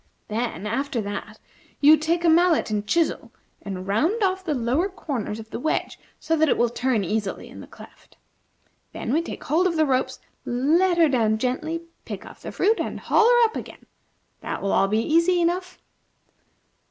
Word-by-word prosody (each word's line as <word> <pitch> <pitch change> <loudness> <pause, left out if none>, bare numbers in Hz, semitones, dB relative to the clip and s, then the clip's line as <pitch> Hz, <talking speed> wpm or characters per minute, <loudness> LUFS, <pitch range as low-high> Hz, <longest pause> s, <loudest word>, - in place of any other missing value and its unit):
Then, 225 -1 -3
after 265 +4 -2
that, 205 +1 -6 0.4
you 300 +2 +7
take 330 +3 -1
a - - +5
mallet 335 -5 +3
and 210 -1 -2
chisel 335 +7 0 0.3
and 190 -2 -6
round 320 - +1
off 380 0 0
the 310 -5 -1
lower 260 +10 0
corners 265 - -4
of 220 0 -11
the - - -4
wedge, 310 - -2 0.2
so 325 - 0
that 315 -1 +3
it - - +2
will 240 -1 +2
turn 245 -4 0
easily 205 +2 -3
in - - -11
the - - -10
cleft. - - -16 0.8
Then 235 - -3
we 320 - +3
take 335 - -7
hold 335 +6 +2
of 340 - -2
the 315 -1 +3
ropes, 260 -2 0 0.2
let 330 +9 +2
her 330 -2 +6
down 225 -6 +2
gently, 285 +8 -2 0.2
pick - - -7
off - - -13
the - - -7
fruit, 435 +4 +1
and - - -3
haul 450 +1 +3
her 485 -1 +5
up 445 -1 +1
again. - - -8 0.5
That - - -5
will 195 - 0
all 195 - +3
be 215 +3 +1
easy 335 +3 +3
enough." 355 +2 -1
295 Hz, 190 wpm, -24 LUFS, 225-340 Hz, 0.8 s, you